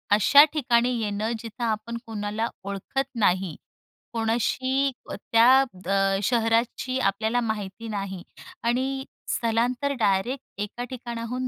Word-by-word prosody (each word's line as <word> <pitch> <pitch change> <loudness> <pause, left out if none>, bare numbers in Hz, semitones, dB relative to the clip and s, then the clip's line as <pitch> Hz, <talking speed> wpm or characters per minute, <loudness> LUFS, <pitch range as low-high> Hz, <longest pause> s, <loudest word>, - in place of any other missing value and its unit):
अशा 280 +8 +8
ठिकाणी 245 -5 +2
येणं, 210 +1 -1
जिथं 230 +2 -7
आपण 225 +1 -2
कोणाला 215 0 -2 0.2
ओळखत 200 +7 -3
नाही, 185 -5 +2 0.6
कोणाशी 255 +4 +1 0.2
अ, - - -3
त्या 230 +2 +4 0.4
अ, 195 0 +2
शहराची 230 +4 +1
आपल्याला 220 +3 +1
माहिती 220 -1 -4
नाही 195 -3 -4 0.4
आणि 265 +3 0 0.2
स्थलांतर 240 +4 0
डायरेक्ट 220 +6 +1 0.2
एका 210 +4 -4
ठिकाणाहून 245 0 -4
230 Hz, 110 wpm, -25 LUFS, 205-250 Hz, 0.6 s, अशा